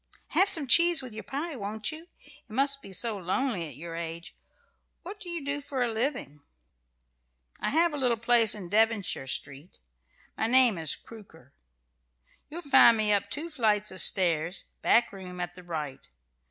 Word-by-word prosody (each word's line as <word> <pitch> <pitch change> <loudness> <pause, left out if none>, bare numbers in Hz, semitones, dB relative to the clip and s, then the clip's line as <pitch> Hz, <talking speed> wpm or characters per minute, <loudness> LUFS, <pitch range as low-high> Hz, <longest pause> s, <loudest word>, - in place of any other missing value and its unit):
"Have 390 - +4
some 320 -7 +7
cheese 340 +2 +5
with 250 -3 -8
your 220 - -6
pie, 300 +3 -5
won't 210 -1 -3
you? 320 +2 -10 0.2
It - - -21
must 275 +4 +1
be 195 - -10
so 215 +2 -1
lonely 190 0 -2
at 145 - -11
your 165 +4 -8
age! 170 0 -7 0.7
What 395 +4 -9
do 375 -4 -9
you 335 -4 -6
do 285 +1 -2
for 270 -3 -3
a 240 - -1
living?" 220 - -3 1.2
"I - - -1
have 330 +1 +2
a - - -3
little 250 -4 0
place 230 -1 +3
in 195 -4 -8
Devonshire 215 -8 +1
Street. 140 +4 -5 0.6
My 220 - -1
name 245 -6 +4
is 160 -3 -2
Crooker. 160 - -16 1.0
You'll 340 +4 -8
find 270 -4 +6
me 210 -1 +1
up 200 -1 -1
two 330 +3 -3
flights 210 -6 +1
of 185 - -2
stairs, 170 -2 +2 0.2
back 235 -3 +2
room, 180 -2 -9
at 175 0 -4
the 180 - -13
right. 155 -6 -6
220 Hz, 175 wpm, -27 LUFS, 180-275 Hz, 1.2 s, some